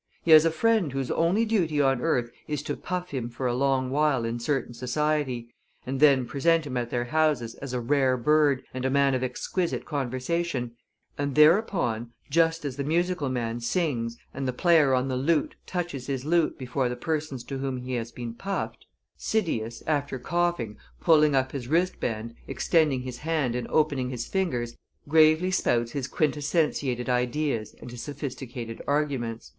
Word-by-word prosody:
He 165 - +2
has 155 0 +9
a - - +5
friend 215 -2 +2
whose 135 -1 -2
only 180 +8 +2
duty 175 -9 +1
on 135 -3 +3
earth 125 -7 0 0.2
is 150 -1 -3
to - - -3
puff 180 0 -4
him 125 -4 -3
for 120 +2 -5
a 120 - +1
long 130 0 +1
while 145 -4 +2
in 115 +1 -2
certain 135 0 -1
society, 130 -1 -1 0.3
and 130 +1 -3
then 140 -4 +5
present 165 +5 +2
him 135 -3 -5
at 120 -1 -1
their 120 0 -1
houses 150 -5 +1
as 140 -2 -5
a 125 - -1
rare 130 +1 +2
bird 145 +1 +3
and 130 0 -4
a 130 - +1
man 140 0 +3
of 130 0 0
exquisite 165 +7 -2
conversation, 135 0 -2 0.5
and 140 -1 -1
thereupon, 150 - +3 0.2
just 165 0 +2
as 135 -2 -4
the 140 - -1
musical 170 -1 0
man 120 -2 -2
sings 120 -3 -1 0.2
and 135 0 -3
the 130 - -1
player 155 -2 +4
on 130 +1 0
the 130 - -1
lute 145 +4 +1
touches 170 -8 -4
his 135 -2 -3
lute 170 0 +2
before 130 -1 -1
the 125 - -3
persons 150 -1 -3
to 135 -1 -5
whom 135 -1 -2
he 125 +1 -5
has 120 -1 -3
been 120 -1 -6
puffed, 195 +11 -4 0.3
Cydias, 120 - -1
after 145 -3 -1
coughing, 155 -6 -1 0.2
pulling 150 -3 +4
up 130 0 +1
his 130 -4 -5
wristband, 125 -9 -1
extending 150 -7 +1
his 125 -1 -6
hand 155 -6 0
and 125 0 -3
opening 140 -5 +1
his 125 -2 -4
fingers, 125 -12 -2 0.3
gravely 160 +4 +5
spouts 120 -9 +1
his 140 -3 -3
quintessentiated 145 -4 0
ideas 125 -1 -1
and 125 - -9
his 120 -1 -7
sophisticated 125 -5 -6
arguments." 135 -6 -1
135 Hz, 175 wpm, -27 LUFS, 125-155 Hz, 0.5 s, has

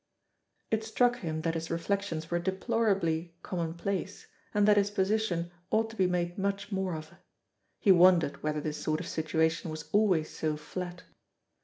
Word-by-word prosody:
It 220 0 +1
struck 245 +2 +2
him 160 -7 -3
that 165 0 0
his 165 0 -4
reflections 170 -1 -2
were 175 - +2
deplorably 190 -3 0
commonplace, 180 +3 -3 0.3
and 205 -1 +3
that 210 - +7
his 205 0 +3
position 190 -4 0 0.2
ought 225 +1 +1
to - - -11
be 190 -4 +3
made 175 0 -1
much 200 +1 -2
more 190 -3 -1
of. 155 0 -8 0.6
He 200 - +4
wondered 175 -4 +5
whether 150 0 -1
this 150 0 -4
sort 155 0 0
of - - -5
situation 160 +1 0
was 155 0 -6
always 190 -7 +3
so 155 -1 -2
flat. 175 +4 -6
175 Hz, 160 wpm, -30 LUFS, 160-200 Hz, 0.6 s, that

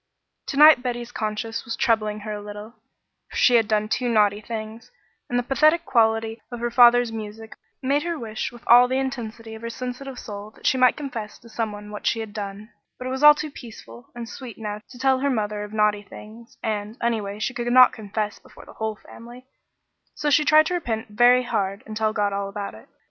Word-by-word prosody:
To 275 - -4
night 300 -3 +8
Betty's 240 -1 -4
conscience 220 0 -3
was 230 - -4
troubling 215 -2 0
her 215 0 -6
a 205 - -6
little, 210 +1 -9 0.6
for - - -12
she 250 - +5
had 225 -3 +4
done 215 -1 +1
two 245 +2 -1
naughty 210 -2 +3
things, 220 +1 -7 0.4
and 245 - 0
the 245 - +1
pathetic 310 +6 +3
quality 225 -1 +1
of 240 - -6
her 240 0 -2
father's 240 -1 +6
music 220 0 -8 0.3
made 280 +3 +2
her 340 0 -3
wish 220 -3 -4
with 240 -1 -14
all 245 +1 +7
the 260 +1 -1
intensity 230 -4 -4
of 220 - -9
her 230 - -5
sensitive 255 +2 -6
soul 205 -2 -8
that - - -17
she - - +3
might 255 -1 +4
confess 235 -8 -6
to 230 - -17
some 220 -1 -2
one 210 0 -9
what 210 - -5
she 230 - +1
had 220 -2 -6
done, 205 +1 -7 0.3
but 255 - -8
it 255 - -3
was 265 +1 -3
all 295 0 +9
too 300 0 -5
peaceful 125 - -12
and 235 -1 -6
sweet 245 -1 -9
now 210 -1 -5
to 250 - -13
tell 265 +1 +2
her 280 +1 0
mother 210 -4 -1
of 210 - -8
naughty 210 -1 +2
things, 220 +3 -13
and, 215 +1 -3
anyway, 215 -4 -2
she 215 +4 -2
could 240 0 -2
not 255 0 +7
confess 210 0 -4
before - - -16
the - - -14
whole 220 -1 -3
family, 240 +4 -13 0.7
so 295 -1 -1
she 300 +2 +5
tried 310 +1 +6
to 360 - -2
repent 230 -11 -3
very 245 +4 +5
hard 200 -2 -2
and 215 - -8
tell 215 0 +1
God 205 -2 0
all 200 0 -2
about 200 0 -6
it. 110 - -15
225 Hz, 220 wpm, -23 LUFS, 210-250 Hz, 0.7 s, all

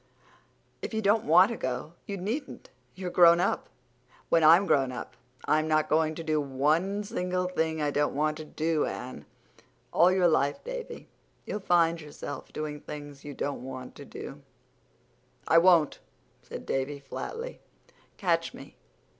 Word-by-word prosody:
"If - - -5
you 220 - 0
don't 210 +2 +3
want 180 +7 +6
to 235 - -4
go 130 +5 -4
you 200 - -4
needn't. 265 - -5 0.2
You're 185 -1 -5
grown 170 -1 +7
up. - - 0 0.6
When 165 - +4
I'm 165 +5 +7
grown 135 -7 +2
up 125 - -7 0.3
I'm 155 0 +2
not 155 -1 +2
going 155 0 +2
to 165 - -6
do 155 -1 +1
one 155 +9 +1
single 180 -4 -2
thing 160 -3 -1
I 145 - +1
don't 145 -1 0
want 155 +1 0
to 155 - -6
do, 155 0 -1
Anne." 125 - -6 0.7
"All 175 +3 +6
your 185 -1 +4
life, 145 -3 +1
Davy, - - -7 0.4
you'll 210 - -3
find 170 -3 +2
yourself 145 -1 -8
doing 150 -1 -5
things 145 -2 -9
you 145 -1 -8
don't 145 +1 -3
want 130 -1 -7
to - - -11
do." - - -9 1.1
"I 165 - +6
won't," 170 -4 +4 0.4
said - - -9
Davy 135 +2 -2
flatly. 460 - -6 0.6
"Catch - - 0
me! - - -13
160 Hz, 155 wpm, -28 LUFS, 145-185 Hz, 1.1 s, grown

